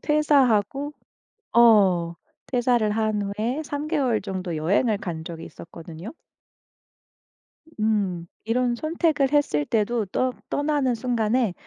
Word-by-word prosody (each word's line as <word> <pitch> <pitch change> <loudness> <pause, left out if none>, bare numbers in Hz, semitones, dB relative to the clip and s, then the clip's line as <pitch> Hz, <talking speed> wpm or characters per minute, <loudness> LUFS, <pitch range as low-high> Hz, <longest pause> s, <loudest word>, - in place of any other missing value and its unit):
퇴사하고 285 -3 +2 0.6
어 195 -8 +5 0.3
퇴사를 245 -3 +1
한 215 -1 0
후에 220 +8 -2
3 290 0 -4
개월 275 -8 +1
정도 185 -4 -4
여행을 200 +8 +1
간 165 -5 -5
적이 165 -1 -7
있었거든요. 165 +3 -10 1.7
음. 200 -6 0 0.2
이런 240 +2 0
선택을 310 -1 0
했을 285 - +1
때도 225 +2 0
떠 255 +7 0 0.2
떠나는 290 -3 0
순간에 235 -2 0
225 Hz, 220 characters per minute, -24 LUFS, 195-265 Hz, 1.7 s, 어